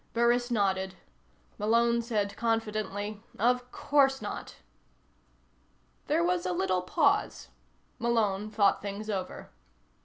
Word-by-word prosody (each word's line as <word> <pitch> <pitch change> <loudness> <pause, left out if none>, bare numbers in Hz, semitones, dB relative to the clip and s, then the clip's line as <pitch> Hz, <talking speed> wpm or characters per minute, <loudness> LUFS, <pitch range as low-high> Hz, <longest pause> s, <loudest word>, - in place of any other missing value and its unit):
Burris 240 +1 +2
nodded. 190 -4 0 0.6
Malone 235 +2 +3
said 210 -4 -1
confidently: 215 -2 -2 0.2
"Of 250 +3 +1
course 270 -2 +2
not." 210 - -6 1.5
There - - +2
was 175 0 +1
a 180 - -1
little 185 0 +1
pause. 65 - +1 0.5
Malone 215 -3 +1
thought 205 -2 +2
things 205 +2 -5
over. 190 -2 -5
215 Hz, 100 wpm, -29 LUFS, 195-235 Hz, 1.5 s, Malone